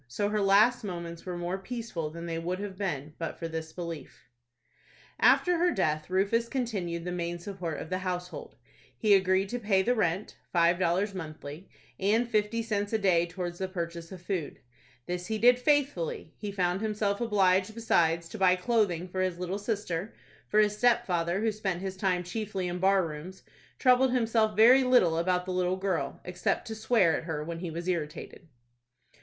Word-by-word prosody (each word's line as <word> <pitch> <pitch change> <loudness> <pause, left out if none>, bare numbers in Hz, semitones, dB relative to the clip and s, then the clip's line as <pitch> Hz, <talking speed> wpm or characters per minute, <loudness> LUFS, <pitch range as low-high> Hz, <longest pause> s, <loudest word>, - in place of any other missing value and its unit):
So 205 +12 -1
her 210 0 0
last 210 +5 +4
moments 170 -3 -6
were 180 -1 -3
more 175 +2 -3
peaceful 220 -7 -5
than 170 +2 -8
they 165 -1 -3
would 175 +2 -2
have 200 -1 -6
been 155 -7 -3
but 165 -1 -4
for 165 - -4
this 160 -1 -5
belief. 170 -2 -8 0.9
After 355 -1 +4
her 355 +1 +4
death, 155 - -1
Rufus 200 +5 +1
continued 190 -10 -3
the 180 - -3
main 175 -1 -3
support 175 -3 -5
of 160 - -8
the 185 - 0
household. 180 -1 -5 0.4
He 215 -3 +4
agreed 190 0 +3
to 245 - -3
pay 200 -4 +2
the 245 - +2
rent,—five 175 -3 0
dollars 185 +3 +1
monthly,—and 185 +7 -3
fifty 220 0 0
cents 205 -2 -2
a - - +4
day 180 -5 +3
towards 175 -1 -5
the 190 - -1
purchase 170 -2 -5
of 185 -2 -10
food. 180 -6 -3 0.5
This 180 0 -4
he 220 - -1
did 245 +3 +5
faithfully. 260 - 0
He 205 -1 -5
found 180 -1 0
himself 210 -1 -1
obliged, 200 -2 +2
besides, 170 -7 +2
to 220 - -8
buy 185 -1 +5
clothing 185 -3 0
for 185 +1 -3
his 185 -2 -1
little 180 +2 -3
sister, 205 -3 -3 0.3
for 210 - +2
his 210 -1 +3
stepfather, 195 -7 +2
who 220 0 +2
spent 195 -4 -3
his 190 -1 -4
time 185 -2 0
chiefly 195 0 -3
in 175 0 -3
bar 190 0 +3
rooms, 160 +4 -8 0.3
troubled 255 0 +4
himself 225 -3 +2
very 250 +5 +7
little 215 -11 +4
about 180 +1 0
the 185 - -3
little 180 0 0
girl, 180 -8 -2
except 180 0 -1
to 225 - -5
swear 220 -6 +3
at - - -4
her 155 -3 -3
when 165 +1 -5
he 175 -1 -4
was 170 +2 -6
irritated. 165 0 -4
185 Hz, 180 wpm, -29 LUFS, 170-215 Hz, 0.9 s, very